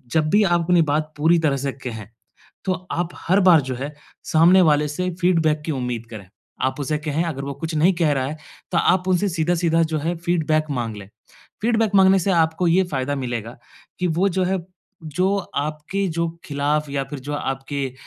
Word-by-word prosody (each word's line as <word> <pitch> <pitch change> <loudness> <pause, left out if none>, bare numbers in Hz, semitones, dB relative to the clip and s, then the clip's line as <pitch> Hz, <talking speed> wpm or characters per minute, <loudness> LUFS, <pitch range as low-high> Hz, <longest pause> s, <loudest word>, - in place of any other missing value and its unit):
जब 155 -1 +2
भी 210 +1 +5
आप 175 -3 +2
अपनी 175 0 +4
बात 155 0 -1
पूरी 165 +3 +4
तरह 150 -4 +1
से 140 +1 -2 0.2
कहें 110 -4 -6 0.6
तो 190 - +2 0.2
आप 175 0 -1
हर 190 +4 +1
बार 170 -4 +7
जो 130 -1 -4
है 140 +4 -5 0.3
सामने 170 +4 +5
वाले 150 -1 +3
से 180 +5 -2
फ़ीडबैक 165 -4 +2
की 160 - -1
उम्मीद 125 -4 -3
करें। 105 -4 -9 0.4
आप 130 +2 -3
उसे 145 +2 -1
कहें 155 +2 -1
अगर 150 -5 -4
वो 140 0 -5
कुछ 160 +4 -5
नहीं 170 +5 +4
कह 165 -3 +2
रहा 130 -2 0
है, 150 +3 -5 0.4
तो 170 - +3
आप 180 +2 +2
उनसे 185 +2 +2
सीधा-सीधा 165 0 +1
जो 160 -1 -1
है 165 +4 -1
फीडबैक 160 -2 0
माँग 120 -5 -3
लें। 100 -2 -10 0.5
फ़ीडबैक 225 -2 +1
माँगने 190 0 +6
से 195 - 0
आपको 165 +1 +2
ये 180 +3 +4
फ़ायदा 135 +1 -1
मिलेगा 120 -3 -4 0.4
कि 180 - +1
वो 175 +4 +2
जो 185 0 0
है 190 +1 0 0.5
जो 185 +6 0 0.3
आपके 155 +6 -3
जो 170 0 -1 0.2
खिलाफ़ 145 +1 -1
या 140 -1 -1
फिर 140 +1 -7
जो 145 +3 -5
आपके 135 -1 -3
155 Hz, 200 wpm, -22 LUFS, 140-175 Hz, 0.6 s, बार